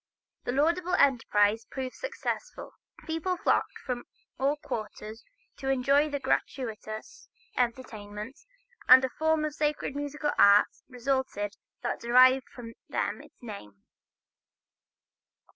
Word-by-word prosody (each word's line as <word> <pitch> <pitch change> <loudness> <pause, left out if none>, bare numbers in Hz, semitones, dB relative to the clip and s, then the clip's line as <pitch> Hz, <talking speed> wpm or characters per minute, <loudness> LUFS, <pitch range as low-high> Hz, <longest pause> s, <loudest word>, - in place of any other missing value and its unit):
The - - -1
laudable 340 +6 +1
enterprise 225 -4 +3
proved 260 -1 -5
successful. - - -5 0.3
People 325 +3 -2
flocked 390 - +1
from 245 -2 -3 0.3
all 280 +3 +1
quarters 215 -3 -6 0.3
to 270 - -3
enjoy 275 +3 +3
the 285 -1 -2
gratuitous 225 - -3 0.3
entertainments, 230 - -4 0.4
and 260 +1 +9
a - - -3
form 315 +2 +1
of 305 - -3
sacred 300 -2 -1
musical 290 +1 -2
art 200 +1 +7 0.2
resulted 250 -5 -2 0.3
that - - -2
derived 255 +2 +5
from 230 -2 -10 0.2
them - - -2
its - - -19
name. 105 - -10
260 Hz, 110 wpm, -29 LUFS, 225-295 Hz, 0.4 s, and